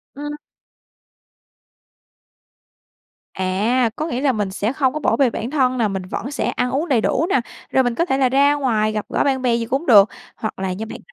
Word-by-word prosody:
Ừm. 295 Hz, +1 st, -5 dB, 3.0 s
À! 210 Hz, +7 st, +1 dB
Có 310 Hz, -, -3 dB
nghĩa 255 Hz, -4 st, -3 dB
là 280 Hz, -2 st, +3 dB
mình 205 Hz, -4 st, -2 dB
sẽ 210 Hz, +6 st, -2 dB
không 265 Hz, -1 st, +1 dB
có 305 Hz, -, -3 dB
bỏ -, -, +1 dB
bê 270 Hz, -4 st, +4 dB
bản 230 Hz, +2 st, -5 dB
thân 255 Hz, -4 st, +1 dB
nè, 225 Hz, -3 st, +2 dB
mình 190 Hz, -2 st, -4 dB
vẫn 270 Hz, -, -4 dB
sẽ 280 Hz, -, -1 dB
ăn 250 Hz, 0 st, -1 dB
uống 300 Hz, +6 st, -1 dB
đầy 250 Hz, -5 st, +3 dB
đủ 285 Hz, +7 st, +1 dB
nè, 270 Hz, -, +2 dB, 0.3 s
rồi 265 Hz, -, +3 dB
mình 245 Hz, -1 st, -1 dB
có 340 Hz, -, +1 dB
thể 265 Hz, -5 st, 0 dB
là 260 Hz, -2 st, +3 dB
ra 280 Hz, +2 st, +4 dB
ngoài 230 Hz, -7 st, 0 dB
gặp 215 Hz, -1 st, -3 dB
gỡ -, -, +1 dB
bạn 270 Hz, -2 st, 0 dB
bè 245 Hz, -2 st, +2 dB
gì 230 Hz, -, -2 dB
cũng 270 Hz, +8 st, -2 dB
được, 205 Hz, -5 st, +7 dB, 0.3 s
hoặc 215 Hz, -3 st, -5 dB
là 190 Hz, -1 st, -2 dB
như 220 Hz, +4 st, -5 dB
bạn -, -, -8 dB
250 Hz, 215 wpm, -20 LUFS, 215-275 Hz, 3.0 s, được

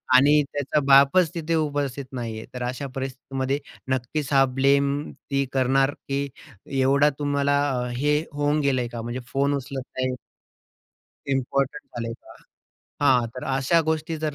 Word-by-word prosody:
आणि 145 Hz, +3 st, +6 dB
त्याचा 145 Hz, +1 st, 0 dB
बापच 140 Hz, +6 st, +5 dB
तिथे 165 Hz, 0 st, -1 dB
उपस्थित 145 Hz, -3 st, -1 dB
नाहीये, 115 Hz, -3 st, -5 dB
तर 125 Hz, -1 st, -4 dB
अशा 130 Hz, +3 st, -3 dB
परिस्थितीमध्ये 135 Hz, +1 st, -3 dB, 0.3 s
नक्कीच, 130 Hz, +3 st, -1 dB
हा 135 Hz, 0 st, +6 dB
ब्लेम 140 Hz, +2 st, +1 dB, 0.2 s
ती 140 Hz, 0 st, +2 dB
करणार 135 Hz, +1 st, +3 dB, 0.2 s
की 140 Hz, 0 st, -1 dB, 0.5 s
एवढा 140 Hz, +3 st, +4 dB
तुम्हाला 145 Hz, 0 st, +1 dB, 0.4 s
हे 150 Hz, +2 st, +2 dB
होऊन 145 Hz, +1 st, +1 dB
गेलंय 130 Hz, -4 st, +1 dB
का 115 Hz, -1 st, -6 dB
म्हणजे 120 Hz, +2 st, -4 dB
फोन 140 Hz, +2 st, +1 dB
उचलत 135 Hz, -1 st, -4 dB
नाही. 130 Hz, 0 st, 0 dB, 1.1 s
इम्पोर्टंट 135 Hz, +2 st, 0 dB
झाले 115 Hz, -1 st, -5 dB
का. -, -, -16 dB, 0.7 s
हां, 125 Hz, -4 st, +4 dB
तर 125 Hz, +2 st, -8 dB
अशा 135 Hz, +5 st, +3 dB
गोष्टी 160 Hz, +1 st, -1 dB
तर 150 Hz, -2 st, -1 dB
140 Hz, 140 wpm, -24 LUFS, 130-145 Hz, 1.1 s, आणि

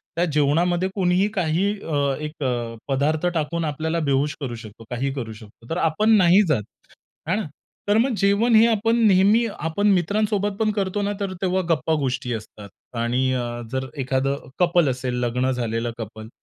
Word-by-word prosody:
त्या 170 Hz, +2 st, +2 dB
जेवणामध्ये 170 Hz, +5 st, +2 dB
कोणीही 185 Hz, 0 st, +2 dB
काही 180 Hz, +1 st, +1 dB
अ, 145 Hz, -3 st, 0 dB
एक 150 Hz, -1 st, -6 dB
अ, 120 Hz, -3 st, -2 dB
पदार्थ 150 Hz, +4 st, +1 dB
टाकून 165 Hz, +1 st, -1 dB
आपल्याला 160 Hz, +2 st, -2 dB
बेहोश 140 Hz, +2 st, +1 dB
करू 125 Hz, -4 st, -4 dB
शकतो, 115 Hz, 0 st, -11 dB
काहीही 135 Hz, +3 st, -2 dB
करू 120 Hz, -5 st, -5 dB
शकतो. 110 Hz, +2 st, -15 dB
तर 165 Hz, -, -2 dB
आपण 180 Hz, +6 st, +1 dB
नाही 185 Hz, +1 st, +6 dB
जात, 135 Hz, -10 st, +1 dB, 0.7 s
हां 185 Hz, -, +2 dB
ना? 215 Hz, -, -2 dB, 0.4 s
तर 205 Hz, -, +4 dB
मग 245 Hz, +2 st, +2 dB
जेवण 200 Hz, +4 st, +3 dB
हे 220 Hz, +1 st, +7 dB
आपण 225 Hz, 0 st, +2 dB
नेहमी 205 Hz, +4 st, +5 dB
आपण 165 Hz, +6 st, 0 dB
मित्रांसोबत 205 Hz, +2 st, 0 dB
पण 220 Hz, -1 st, +2 dB
करतो 200 Hz, 0 st, -1 dB
ना, 205 Hz, 0 st, 0 dB
तर 195 Hz, -2 st, -2 dB
तेव्हा 190 Hz, 0 st, +1 dB
गप्पा-गोष्टी 140 Hz, -6 st, 0 dB
असतात. 105 Hz, -2 st, -9 dB, 0.3 s
आणि 125 Hz, +3 st, +1 dB
अ, 125 Hz, -, -1 dB, 0.3 s
जर 130 Hz, 0 st, -2 dB
एखादं 135 Hz, +1 st, -1 dB
कपल 175 Hz, -3 st, +3 dB
असेल, 125 Hz, 0 st, -3 dB
लग्न 125 Hz, +2 st, 0 dB
झालेलं 115 Hz, -1 st, -2 dB
कपल, 110 Hz, -1 st, -8 dB
155 Hz, 170 wpm, -23 LUFS, 130-190 Hz, 0.7 s, हे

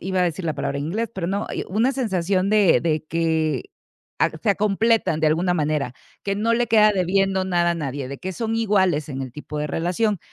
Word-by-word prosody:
Iba 185 Hz, 0 st, -1 dB
a -, -, +4 dB
decir 175 Hz, +1 st, -2 dB
la 160 Hz, -2 st, -1 dB
palabra 140 Hz, 0 st, -3 dB
en 145 Hz, -, -3 dB
inglés, 225 Hz, +7 st, -2 dB
pero 185 Hz, -3 st, -3 dB
no. 200 Hz, +4 st, -2 dB, 0.2 s
Una 225 Hz, +7 st, +2 dB
sensación 190 Hz, -6 st, 0 dB
de 210 Hz, -5 st, +4 dB
de 155 Hz, -2 st, -1 dB
que 160 Hz, -4 st, 0 dB, 0.6 s
a -, -, +4 dB
se 195 Hz, +6 st, 0 dB
completan 210 Hz, -4 st, +2 dB
de 155 Hz, -, +3 dB
alguna 175 Hz, +4 st, +2 dB
manera, 150 Hz, -5 st, -1 dB, 0.3 s
que 200 Hz, 0 st, -2 dB
no 230 Hz, +2 st, +1 dB
le 240 Hz, 0 st, 0 dB
queda 215 Hz, -1 st, +5 dB
debiendo 190 Hz, 0 st, +1 dB
nada 175 Hz, -2 st, +1 dB
a -, -, -3 dB
nadie, 140 Hz, -4 st, -4 dB
de 140 Hz, -, -7 dB
que 190 Hz, 0 st, -5 dB
son 225 Hz, +3 st, -2 dB
iguales 190 Hz, -9 st, +1 dB
en 135 Hz, -1 st, -4 dB
el 130 Hz, -, -7 dB
tipo 150 Hz, +2 st, -7 dB
de 150 Hz, -, -1 dB
relación. 180 Hz, +6 st, 0 dB
180 Hz, 215 wpm, -22 LUFS, 155-205 Hz, 0.6 s, queda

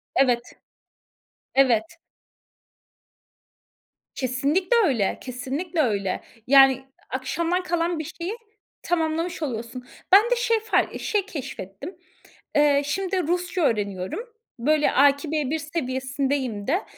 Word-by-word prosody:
Evet. 250 Hz, -3 st, +3 dB, 1.1 s
Evet. 250 Hz, -5 st, +4 dB, 2.3 s
Kesinlikle 280 Hz, -, +1 dB
öyle. 225 Hz, -8 st, 0 dB
Kesinlikle 280 Hz, +7 st, -3 dB
öyle. 200 Hz, -7 st, 0 dB, 0.3 s
Yani 270 Hz, -1 st, +6 dB, 0.3 s
akşamdan 335 Hz, +8 st, -1 dB
kalan 340 Hz, -1 st, -1 dB
bir 310 Hz, -, -5 dB
şeyi, 405 Hz, +7 st, -3 dB, 0.5 s
tamamlamış 330 Hz, +1 st, -1 dB
oluyorsun. 240 Hz, -1 st, -5 dB, 0.3 s
Ben 400 Hz, +3 st, +9 dB
de -, -, +5 dB
şey 460 Hz, -2 st, +1 dB
far 395 Hz, -4 st, +1 dB, 0.4 s
keşfettim. 270 Hz, -, -7 dB, 0.6 s
Eee, 290 Hz, -1 st, +4 dB
şimdi 380 Hz, +4 st, -1 dB
Rusça 355 Hz, 0 st, -1 dB
öğreniyorum. 200 Hz, -, -1 dB, 0.4 s
Böyle 300 Hz, +5 st, +2 dB
A2, 285 Hz, +2 st, +3 dB
B1 305 Hz, 0 st, 0 dB
seviyesindeyim 265 Hz, -6 st, -2 dB
de 355 Hz, +8 st, 0 dB
285 Hz, 95 wpm, -24 LUFS, 255-345 Hz, 2.3 s, Ben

